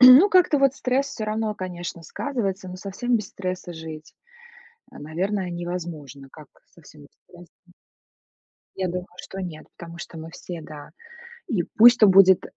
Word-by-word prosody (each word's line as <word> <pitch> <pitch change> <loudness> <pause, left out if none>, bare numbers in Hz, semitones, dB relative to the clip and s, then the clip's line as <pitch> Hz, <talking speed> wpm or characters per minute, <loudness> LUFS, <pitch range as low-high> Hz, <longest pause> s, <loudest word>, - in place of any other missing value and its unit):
Ну, 255 +10 +10
как-то 360 -5 +5
вот 275 -1 +3
стресс 260 +1 0
всё 235 -6 -5
равно, 215 0 -2
конечно, 175 -3 -6
сказывается, 200 - -3
но 180 - -7
совсем 205 +6 -1
без 210 -2 -4
стресса 185 -2 -5
жить, 160 -1 -9 0.8
а, - - -12
наверное, 180 +5 -2
невозможно. 170 -6 -6
Как 155 -1 -13 0.2
совсем 155 -2 -17
без 145 - -16 0.2
стресса? 175 -1 -16 1.2
Я 190 -1 -1
думаю, 180 +1 -4
что 190 +1 -8
нет, 170 -4 -7
потому 170 0 -10
что 170 - -9
мы 160 +1 -8
все, 175 -1 -8
да. 150 -1 -11 0.6
И 215 - 0
пусть 240 +2 +8
там 210 -3 +7
будет 190 -1 +7
185 Hz, 160 wpm, -24 LUFS, 165-215 Hz, 1.2 s, Ну